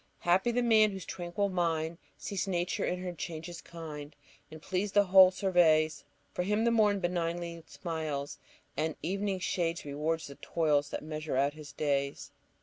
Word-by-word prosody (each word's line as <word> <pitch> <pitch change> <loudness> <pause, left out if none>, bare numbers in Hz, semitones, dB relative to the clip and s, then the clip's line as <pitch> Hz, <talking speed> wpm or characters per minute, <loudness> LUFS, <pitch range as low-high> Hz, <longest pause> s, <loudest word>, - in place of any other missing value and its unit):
"Happy 185 +6 +3
the 245 +1 +1
man 220 -2 +5
whose 190 -2 -7
tranquil 180 +3 -2
mind 170 -3 -1 0.2
Sees 200 -2 -3
Nature 175 -1 -1
in 180 0 -2
her 180 -1 -4
changes 170 +1 -6
kind, 150 -3 -8 0.3
And 155 - -10
pleased 190 +5 -2
the 205 - +7
whole 190 -1 +8
surveys; 160 -6 +3 0.3
For - - -1
him 210 +4 +1
the 235 - +3
morn 210 -3 +3
benignly 170 -1 -2
smiles, 155 -5 -4 0.4
And 160 -1 -1
evening 195 +2 -1
shades 170 -2 -1
reward 150 +3 -1
the 140 -3 -9
toils 150 -3 +1
That - - -5
measure 155 -2 -3
out 140 +2 +2
his 150 -2 -10
days. 140 -1 -1
170 Hz, 160 wpm, -31 LUFS, 155-190 Hz, 0.4 s, whole